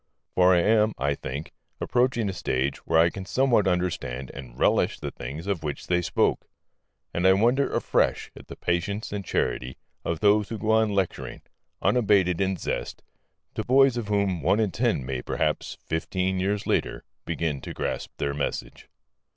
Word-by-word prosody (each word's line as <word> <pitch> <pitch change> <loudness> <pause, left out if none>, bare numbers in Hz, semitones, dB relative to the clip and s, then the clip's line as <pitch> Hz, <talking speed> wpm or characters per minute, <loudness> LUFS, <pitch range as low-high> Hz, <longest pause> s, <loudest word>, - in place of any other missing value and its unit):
For 90 0 +5
I 85 - +4
am 110 +2 +3
(I 70 +2 +1
think) 70 +2 -6 0.3
approaching 120 -3 +1
a 95 - -2
stage 65 -5 -1
where - - +3
I 85 +1 +5
can 95 - -6
somewhat 120 -2 +2
understand 85 -8 -1
and 65 -3 -10
relish - - +2
the - - -4
things 70 +8 -7
of 100 -5 -1
which 75 -2 -4
they 90 0 +1
spoke. - - 0 0.7
And 90 +2 +2
I 95 - +7
wonder 120 +8 +2
afresh - - +1
at - - -13
the - - -8
patience 100 +5 -2
and 100 -1 -3
charity 65 -7 -2 0.3
of 85 -2 -2
those 105 0 +3
who 115 - -4
go 110 +1 0
on 110 0 +4
lecturing, 95 -3 -2 0.4
unabated 100 -7 +3
in 95 -1 +1
zest, - - -4 0.5
to - - -3
boys 135 0 +5
of 120 -3 -3
whom 100 -4 0
one 95 +8 +2
in 105 -4 +1
ten 110 - 0
may 65 -1 -3
perhaps, - - -2
fifteen 95 +3 -1
years 100 +2 -1
later, - - -1 0.2
begin 80 -4 -2
to - - -7
grasp - - -3
their 70 - -1
message. 70 0 -4
95 Hz, 175 wpm, -26 LUFS, 80-105 Hz, 0.7 s, I